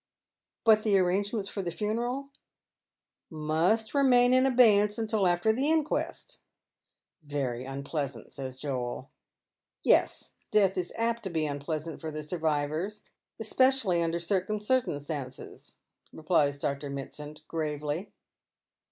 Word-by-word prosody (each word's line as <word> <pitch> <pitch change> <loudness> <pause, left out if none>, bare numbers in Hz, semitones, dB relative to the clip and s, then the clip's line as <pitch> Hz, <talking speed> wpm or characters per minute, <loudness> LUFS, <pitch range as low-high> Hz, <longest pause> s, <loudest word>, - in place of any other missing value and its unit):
" - - -63
But 220 -1 +6
the 210 -2 +3
arrangements 195 +3 0
for 200 - -4
the 175 - -3
funeral 240 +8 -2 0.4
" - - -63 0.2
" - - -62 0.2
Must 200 +8 +2
remain 250 -3 +5
in 255 +1 +5
abeyance 215 -5 +5
till 215 -4 +2
after 175 +5 +2
the 270 +6 +1
inquest." 315 -1 -1 0.4
" - - -44
Very 135 -5 -3
unpleasant," 140 -2 -4
says 130 -2 -7
Joel. 130 -2 -4 0.3
" - - -62
Yes, - - 0 0.2
death 200 -3 +3
is 180 -1 -2
apt 230 0 0
to - - -2
be 160 -3 -1
unpleasant 150 +2 -4
for 160 - -4
the 155 0 -5
survivors, 160 +5 -2 0.4
especially 230 -4 +2
tinder 170 0 0
certain 190 +4 -1
circumstances," 145 - -3 0.3
replies 155 -3 +1
Dr. 140 0 -3
Mitsand, 150 +2 -7
gi 165 - -7
avely. 150 +3 -2
175 Hz, 135 wpm, -29 LUFS, 145-220 Hz, 0.4 s, But